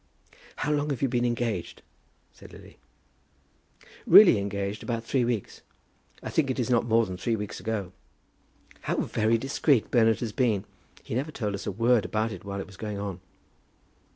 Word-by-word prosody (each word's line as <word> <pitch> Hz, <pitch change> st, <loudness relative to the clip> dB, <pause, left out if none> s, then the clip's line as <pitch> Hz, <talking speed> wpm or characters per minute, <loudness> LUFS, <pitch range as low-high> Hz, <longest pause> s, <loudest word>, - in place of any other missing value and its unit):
"How 150 Hz, -, -2 dB
long 150 Hz, 0 st, 0 dB
have 140 Hz, -1 st, -2 dB
you -, -, +4 dB
been 120 Hz, -1 st, 0 dB
engaged?" 120 Hz, -6 st, -2 dB, 0.5 s
said -, -, -15 dB
Lily. -, -, -14 dB, 1.3 s
"Really 180 Hz, -, +8 dB
engaged, 100 Hz, +1 st, -3 dB
about 115 Hz, -2 st, -3 dB
three 125 Hz, +2 st, 0 dB
weeks. 120 Hz, -4 st, -3 dB, 0.6 s
I -, -, -5 dB
think 150 Hz, -4 st, +1 dB
it 130 Hz, -, -1 dB
is 125 Hz, -1 st, -1 dB
not 120 Hz, -1 st, +2 dB
more 115 Hz, 0 st, +3 dB
than 95 Hz, -2 st, -6 dB
three 115 Hz, +5 st, -1 dB
weeks 105 Hz, -2 st, -5 dB
ago." 105 Hz, -5 st, -3 dB, 0.9 s
"How -, -, -2 dB
very 110 Hz, +1 st, +1 dB
discreet 135 Hz, 0 st, +1 dB
Bernard 115 Hz, -2 st, +4 dB
has 115 Hz, -3 st, -2 dB
been. 110 Hz, -6 st, 0 dB, 0.4 s
He -, -, -7 dB
never 135 Hz, +6 st, -2 dB
told 105 Hz, -8 st, -3 dB
us 100 Hz, -, -5 dB
a -, -, 0 dB
word 115 Hz, +2 st, +2 dB
about 110 Hz, +1 st, -1 dB
it -, -, -8 dB
while 100 Hz, 0 st, -5 dB
it -, -, -5 dB
was 95 Hz, -1 st, -15 dB
going 105 Hz, -2 st, -5 dB
on." 100 Hz, -3 st, -5 dB
115 Hz, 180 wpm, -27 LUFS, 100-125 Hz, 1.3 s, Really